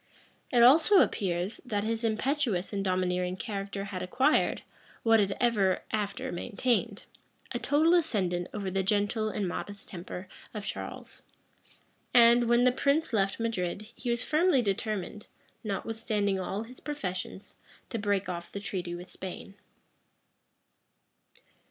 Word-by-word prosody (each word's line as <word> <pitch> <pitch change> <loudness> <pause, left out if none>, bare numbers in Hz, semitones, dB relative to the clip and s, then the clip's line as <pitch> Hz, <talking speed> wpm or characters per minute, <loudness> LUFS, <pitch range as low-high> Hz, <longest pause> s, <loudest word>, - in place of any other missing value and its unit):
It 240 -2 +5
also 320 +9 +7
appears, 180 0 -1
that 210 -6 -2
his 225 +1 -2
impetuous 225 -4 0
and 200 -1 -1
domineering 180 -1 0
character 200 -1 -4
had 195 -2 -5
acquired, 260 +11 +2 0.4
what 225 -1 +5
it 200 -1 +2
ever 205 -6 +2
after 210 -2 -2
maintained, 235 +6 -1 0.5
a - - -2
total 310 +4 +3
ascendant 190 - +1
over 200 -3 -3
the 195 +1 +1
gentle 205 +2 +1
and 205 -2 -2
modest 200 +3 -5
temper 180 +1 -7 0.3
of 210 -1 -5
Charles; - - -6 0.9
and, 235 0 +7
when 240 +1 +5
the 250 - +5
prince 280 +3 +1
left 195 -1 +1
Madrid, 210 -2 -2
he 245 - -5
was 235 0 +1
firmly 310 -4 +3
determined, 210 0 -3 0.4
notwithstanding 210 -1 -1
all 195 +3 -3
his 250 +3 -12
professions, 190 -9 -5 0.4
to 230 - -2
break 205 -2 0
off 175 -1 -5
the 200 - -5
treaty 180 -3 -4
with 175 +1 -8
Spain. 190 +1 -8
210 Hz, 135 wpm, -29 LUFS, 190-235 Hz, 0.9 s, also